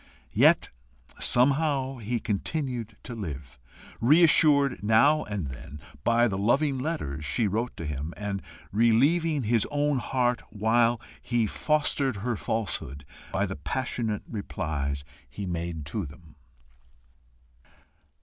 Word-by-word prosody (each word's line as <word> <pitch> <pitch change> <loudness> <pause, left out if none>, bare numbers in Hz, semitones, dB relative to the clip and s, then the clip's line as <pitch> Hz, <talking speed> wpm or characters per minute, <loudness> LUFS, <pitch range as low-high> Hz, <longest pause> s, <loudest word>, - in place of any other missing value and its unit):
Yet - - +5 0.5
somehow 135 0 +2
he 120 +1 -2
continued 120 - -3
to 125 - -7
live, 70 - -7 0.4
reassured 145 0 +5
now 115 +9 +4
and 100 -9 -4
then 65 +3 -9 0.2
by 120 +1 +4
the 95 -3 -2
loving 135 +6 +2
letters 105 - -3
she 105 - +1
wrote 115 +5 -2
to 85 - -5
him, 75 +1 -4
and 100 -2 -3 0.3
relieving 140 - +3
his 115 0 +2
own 145 -1 +1
heart 125 -1 0
while 115 +2 +2 0.2
he 120 -2 +1
fostered 140 +1 0
her 115 +4 -2
falsehood 80 -11 -3 0.3
by 100 +1 +1
the 95 - -4
passionate 115 - -2
replies 75 - -3 0.3
he 100 +9 -6
made 85 -3 -4
to 90 +3 -3
them. 75 +2 -15
115 Hz, 120 wpm, -27 LUFS, 90-130 Hz, 0.5 s, Yet